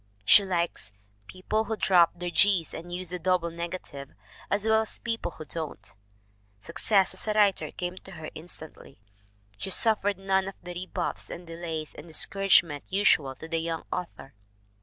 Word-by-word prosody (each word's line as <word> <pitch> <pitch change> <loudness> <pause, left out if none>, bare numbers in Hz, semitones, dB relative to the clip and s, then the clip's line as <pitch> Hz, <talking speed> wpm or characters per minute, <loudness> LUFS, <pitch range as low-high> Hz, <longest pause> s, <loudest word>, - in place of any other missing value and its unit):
She 200 - +8
likes 170 - -2 0.3
"people 215 - -1
who 220 -1 -3
drop 175 -5 +5
their 175 0 -4
g's 190 -3 +3
and 175 +1 -8
use 180 -1 -4
the 180 - -3
double 180 -1 +1
negative, 170 -5 -6 0.4
as 205 +1 0
well 220 0 +4
as 220 - -3
people 230 -4 -3
who 155 - -9
don't." 140 -12 -6 0.7
Success 190 - +1
as - - -5
a 215 - +2
writer 205 -3 +3
came 180 +1 -5
to 190 - -11
her 160 -2 -7
instantly. 160 -6 -10 0.6
She - - -4
suf 220 +2 +4
fered 200 -1 0
none 195 0 +1
of 195 - -6
the 175 0 -6
rebuffs 180 0 -3
and 175 - -7
delays 165 -2 -5
and 150 - -11
discourage 195 +2 +4
ments 145 -1 -9
usual 155 -9 +3
to 160 - -9
the 165 0 -1
young 165 0 -3
author. 170 -6 -6
175 Hz, 175 wpm, -28 LUFS, 165-195 Hz, 0.7 s, She